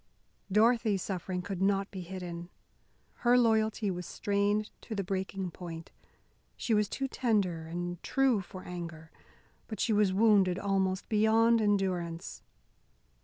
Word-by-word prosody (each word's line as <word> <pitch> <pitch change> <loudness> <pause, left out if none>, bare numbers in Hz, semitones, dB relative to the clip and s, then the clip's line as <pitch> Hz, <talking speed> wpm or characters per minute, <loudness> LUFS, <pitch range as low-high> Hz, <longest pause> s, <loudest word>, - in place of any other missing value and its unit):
Dorothy's 220 -2 +3
suffering 180 -1 -3
could 195 -2 -5
not 195 0 +1
be 190 - -6
hidden. 175 -1 -7 0.7
Her 245 0 +4
loyalty 220 -3 +2
was 180 -1 -5
strained 205 +1 0
to 220 - -6
the 200 - -1
breaking 190 0 -3
point. 165 -2 -8 0.7
She 230 - -1
was 210 -1 +2
too 270 - -2
tender 200 -11 0
and 175 +1 -4
true 265 -6 +2
for 185 0 -10
anger, 170 -3 -7 0.6
but 215 - -6
she 225 - +1
was 205 -2 +3
wounded 195 -3 +4
almost 190 -1 0
beyond 225 +2 +4
endurance. 185 -5 -1
195 Hz, 130 wpm, -30 LUFS, 180-215 Hz, 0.7 s, Her